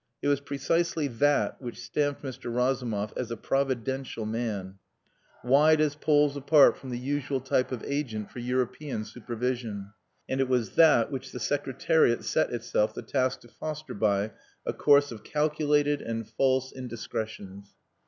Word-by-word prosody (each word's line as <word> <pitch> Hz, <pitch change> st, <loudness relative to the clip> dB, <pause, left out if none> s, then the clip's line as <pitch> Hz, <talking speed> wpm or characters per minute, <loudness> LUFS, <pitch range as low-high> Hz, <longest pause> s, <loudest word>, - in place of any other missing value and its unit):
It -, -, +2 dB
was 140 Hz, -1 st, +2 dB
precisely 155 Hz, +3 st, 0 dB
that 145 Hz, +4 st, +1 dB
which 120 Hz, -2 st, -7 dB
stamped 145 Hz, +4 st, -1 dB
Mr. 130 Hz, -3 st, -6 dB
Razumov 120 Hz, -4 st, 0 dB
as 125 Hz, -, -3 dB
a 115 Hz, -, -4 dB
providential 130 Hz, -2 st, -1 dB
man, 105 Hz, -4 st, -3 dB, 0.6 s
wide 150 Hz, +5 st, +5 dB
as 155 Hz, -2 st, +2 dB
poles 145 Hz, -1 st, +2 dB
apart 145 Hz, +1 st, +5 dB
from 130 Hz, -, -10 dB
the 120 Hz, -, -3 dB
usual 135 Hz, +1 st, -2 dB
type 130 Hz, 0 st, 0 dB
of 125 Hz, -4 st, -4 dB
agent 125 Hz, -8 st, -3 dB
for -, -, -8 dB
"European 125 Hz, 0 st, -2 dB
supervision." 115 Hz, -2 st, -4 dB, 0.4 s
And 130 Hz, 0 st, 0 dB
it 130 Hz, -, 0 dB
was 120 Hz, -6 st, +1 dB
that 150 Hz, -7 st, +5 dB
which 135 Hz, -1 st, -5 dB
the 125 Hz, -, -6 dB
Secretariat 135 Hz, 0 st, +1 dB
set -, -, +1 dB
itself 115 Hz, -2 st, 0 dB
the -, -, -6 dB
task 130 Hz, -2 st, 0 dB
to -, -, -16 dB
foster 155 Hz, +5 st, -6 dB
by 100 Hz, 0 st, +1 dB, 0.3 s
a -, -, -1 dB
course 145 Hz, -1 st, +4 dB
of 110 Hz, -2 st, -9 dB
calculated 150 Hz, -1 st, +1 dB
and 115 Hz, -1 st, -4 dB
false 130 Hz, -1 st, +1 dB
indiscretions. 110 Hz, -5 st, -6 dB
130 Hz, 155 wpm, -28 LUFS, 115-145 Hz, 0.6 s, wide